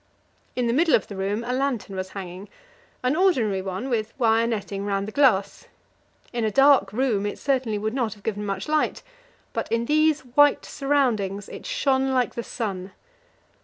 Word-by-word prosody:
In 250 - 0
the 235 - +1
middle 320 +3 +4
of 210 - 0
the 200 - -9
room 200 +4 -2
a 245 +1 -2
lantern 255 -7 -2
was 185 0 -4
hanging, 185 +1 -7 0.5
an 255 +3 +2
ordinary 255 - +2
one 190 +6 -4
with 225 -3 -2
wire 230 -2 +3
netting 205 -3 -3
round 200 0 -1
the - - -5
glass. 215 -8 +2 0.7
In 240 -1 -1
a 220 - +2
dark 270 -3 +5
room 215 -3 0
it 205 - -4
certainly 255 -6 0
would 215 +2 -2
not 240 -6 -1
have 205 - -20
given 210 -2 -3
much 195 -1 -3
light, 305 0 0 0.5
but - - -3
in 230 +1 +1
these 310 +2 +3
white 280 +3 +3
surroundings 230 -9 0
it - - -9
shone 270 - +1
like 250 -2 +1
the 235 - -3
sun. 195 -5 -5
230 Hz, 180 wpm, -24 LUFS, 200-270 Hz, 0.7 s, dark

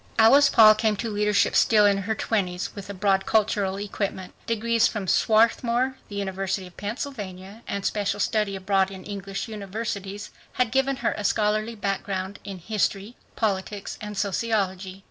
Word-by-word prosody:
Alice 275 +6 +7
Paul 215 -1 +8
came 215 0 +1
to 225 +2 -4
leadership 210 0 +2
still 215 -2 +5
in 200 -1 +3
her 220 +3 -2
twenties, 185 -5 -1
but - - -21
with 200 -1 -8
a - - -4
broad 195 0 +1
cultural 205 -3 +1
equipment. 200 -2 -4
Degrees 230 0 +2
from 210 -3 -4
Swarthmore, 235 +5 +2
the 205 - -8
University 195 -1 -2
of 180 - -14
Pennsylvania, 205 -3 -6
and 200 -1 -3
special 205 -2 -1
study 210 -3 0
abroad 195 0 +1
in 190 -1 -9
English 195 +1 -5
universities 205 -1 -5 0.2
had 250 -3 0
given 270 +1 +1
her - - +2
a 210 - -5
scholarly 215 +2 0
background 195 -1 -3
in 195 -2 -7
history, 205 +3 -2 0.2
politics, 200 -1 -2
and 210 -1 -6
sociology. 195 -3 -1
205 Hz, 160 wpm, -25 LUFS, 195-220 Hz, 0.2 s, Paul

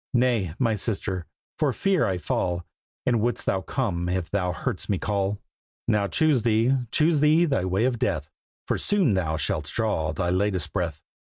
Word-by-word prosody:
"Nay, 120 -9 +2
my 115 -3 +2
sister, 95 -4 -3 0.3
for 150 -3 +3
fear 190 +5 +1
I 95 - 0
fall. 90 0 -1 0.4
And 120 -3 +2
wouldst 120 +2 -1
thou 95 - +1
come 95 -9 -2
if 90 -2 -2
thou 90 -3 0
heardst 90 +1 -4
me 100 - +2
call?" 100 0 -1 0.5
"Now 105 -3 +2
choose 150 +1 +2
thee, 115 +3 +3 0.2
choose 155 0 +3
thee 155 +3 +5
thy 135 - 0
way 95 +5 +1
of 125 -3 0
death, 80 - -1 0.4
For - - 0
soon 190 - +2
thou 80 -4 0
shalt 75 - -1
draw 80 -8 0
thy 85 +2 -1
latest 95 -2 0
breath. 80 -4 -2
100 Hz, 175 wpm, -25 LUFS, 90-125 Hz, 0.5 s, thee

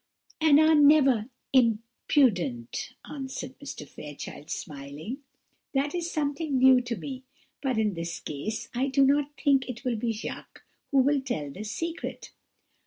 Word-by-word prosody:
"And 305 -2 +6
are 315 +1 +6
never 285 -7 +5 0.3
imprudent!" 225 - +1
answered 265 -2 -6
Mr. 280 - -8
Fairchild, 145 +1 -9
smiling; 145 - -6 0.6
"that 280 +2 +1
is 345 -1 -2
something 290 -2 -1
new 255 0 +7
to 240 -1 -3
me; 265 +2 -6 0.4
but 260 -4 0
in 215 -2 +2
this 170 0 -4
case 215 +11 -4
I 255 +3 0
do 275 0 +4
not 285 +1 +3
think 270 -2 +3
it 245 0 -6
will 245 -3 0
be 230 +1 -1
Jacques 220 0 -7 0.3
who 270 -2 +4
will 280 +1 +2
tell 155 - -3
this 210 +8 -6
secret." 330 +8 -5
255 Hz, 145 wpm, -28 LUFS, 215-285 Hz, 0.6 s, new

